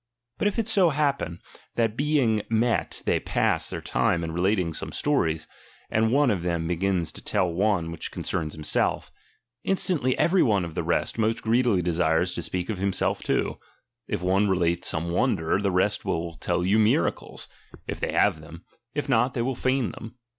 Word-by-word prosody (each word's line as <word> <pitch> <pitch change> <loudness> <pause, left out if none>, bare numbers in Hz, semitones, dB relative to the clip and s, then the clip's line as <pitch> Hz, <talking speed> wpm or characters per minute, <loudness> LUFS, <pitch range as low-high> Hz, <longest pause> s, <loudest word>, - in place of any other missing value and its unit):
But - - +2
if 205 - -1
it 225 -2 0
so 195 -6 +4
happen, 140 - -1 0.4
that 115 -2 +1
being 135 -6 +2
met 115 +1 0
they - - +2
pass - - 0
their - - -4
time 85 - +1
in 80 - -3
relating 90 0 0
some - - -4
stories, 80 - 0 0.4
and 110 +1 +2
one 140 -1 +4
of 95 -5 -1
them 85 -1 -1
begins 90 0 0
to - - -10
tell 90 -2 0
one 95 -3 +1
which 85 - -5
concerns 80 -4 -2
himself; 75 -1 0 0.5
instantly 170 -9 +1
every 180 +1 +3
one 100 -6 +2
of 85 - -8
the - - -2
rest - - -1
most 110 +1 0
greedily 115 -5 +2
desires 85 +1 +1
to - - -3
speak 90 -1 -2
of 100 - -5
himself 100 0 0
too; - - -1 0.5
if - - -3
one 95 +3 +2
relate 85 -2 +1
some 85 +1 -2
wonder, 80 0 +1
the 100 -1 0
rest 95 +3 +1
will 85 0 -2
tell 90 +3 -1
you 100 +4 +3
miracles, 110 0 0 0.4
if - - -5
they - - -2
have 80 - +2
them; 85 +3 -12 0.3
if 145 - -2
not, 125 -1 +2
they 120 - 0
will 130 +2 -1
feign 130 0 0
them. 115 +2 -10
100 Hz, 185 wpm, -25 LUFS, 85-125 Hz, 0.5 s, so